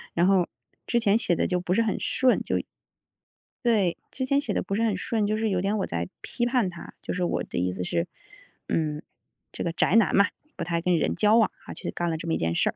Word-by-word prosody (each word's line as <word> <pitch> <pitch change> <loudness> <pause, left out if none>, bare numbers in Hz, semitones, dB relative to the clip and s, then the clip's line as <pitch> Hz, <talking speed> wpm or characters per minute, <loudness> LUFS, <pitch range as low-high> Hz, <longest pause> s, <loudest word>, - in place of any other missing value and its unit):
然 170 - +4
后 185 -2 +4 0.4
之 240 - +1
前 215 -3 +4
写 180 -6 +1
得 - - +1
就 180 -1 0
不 180 0 -1
是 230 - +3
很 220 -3 0
顺， 260 -1 +2
就 - - -1 1.1
对， 205 -7 +3
之 260 - -3
前 280 +1 +3
写 235 -8 -2
得 - - 0
不 195 - -3
是 225 - +1
很 220 -3 +2
顺， 210 +3 -1
就 210 +1 +1
是 220 -1 +1
有 185 -2 +1
点 195 +3 0
我 190 - -1
在 85 0 -2
批 240 - -2
判 240 -5 +2
他， 170 -1 -10
就 - - -5
是 180 - -1
我 175 - 0
的 - - -6
意 90 +1 +1
思 90 0 -4
是， 85 -1 0 0.6
嗯， 150 -2 -1 0.5
这 - - -4
个 170 - -1
宅 175 +3 +2
男 225 -3 +5
嘛， 200 +1 +6 0.3
不 - - -4
太 170 0 -1
跟 180 0 +2
人 160 - +1
交 215 +1 +4
往， 225 - +4 0.2
啊， - - -7
去 - - -5
干 175 - -2
了 - - -1
这 165 +1 -6
么 165 - +1
一 - - 0
件 85 0 0
事 - - +2
儿。 - - -5
190 Hz, 280 characters per minute, -26 LUFS, 170-220 Hz, 1.1 s, 嘛